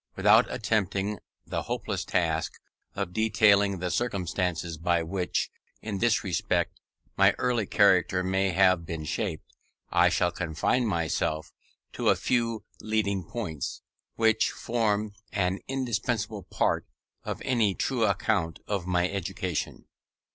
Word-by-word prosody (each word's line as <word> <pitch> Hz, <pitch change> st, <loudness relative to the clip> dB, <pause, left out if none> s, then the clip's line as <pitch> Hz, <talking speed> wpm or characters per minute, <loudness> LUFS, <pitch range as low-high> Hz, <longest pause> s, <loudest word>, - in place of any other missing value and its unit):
Without -, -, +5 dB
attempting 105 Hz, -1 st, -1 dB, 0.3 s
the -, -, -2 dB
hopeless -, -, -3 dB
task 80 Hz, -2 st, 0 dB, 0.4 s
of 100 Hz, -3 st, -3 dB
detailing 105 Hz, -2 st, +4 dB
the 90 Hz, 0 st, -2 dB
circumstances 90 Hz, -6 st, -1 dB
by 85 Hz, 0 st, +1 dB
which, 90 Hz, +2 st, -2 dB, 0.3 s
in 105 Hz, -3 st, -4 dB
this 120 Hz, 0 st, +2 dB
respect, 90 Hz, -4 st, -1 dB, 0.4 s
my -, -, +5 dB
early 120 Hz, -5 st, 0 dB
character 95 Hz, -3 st, +4 dB
may 95 Hz, +1 st, +1 dB
have 95 Hz, -1 st, +4 dB
been 80 Hz, -1 st, -5 dB
shaped, 80 Hz, +1 st, -3 dB, 0.4 s
I -, -, +5 dB
shall -, -, +1 dB
confine 95 Hz, +10 st, 0 dB
myself 80 Hz, -4 st, -1 dB, 0.4 s
to -, -, +1 dB
a -, -, +5 dB
few 115 Hz, -3 st, 0 dB
leading 100 Hz, -3 st, 0 dB
points, 80 Hz, -, -5 dB, 0.3 s
which 110 Hz, -1 st, +3 dB
form 110 Hz, -3 st, -1 dB, 0.2 s
an 95 Hz, -1 st, 0 dB
indispensable 115 Hz, -4 st, -2 dB
part 90 Hz, -, 0 dB, 0.4 s
of -, -, -4 dB
any 110 Hz, -7 st, +2 dB
true 125 Hz, -4 st, 0 dB
account 100 Hz, -5 st, 0 dB
of 100 Hz, -4 st, -2 dB
my 90 Hz, -1 st, +2 dB
education. 95 Hz, -3 st, -3 dB
100 Hz, 125 wpm, -28 LUFS, 90-110 Hz, 0.4 s, Without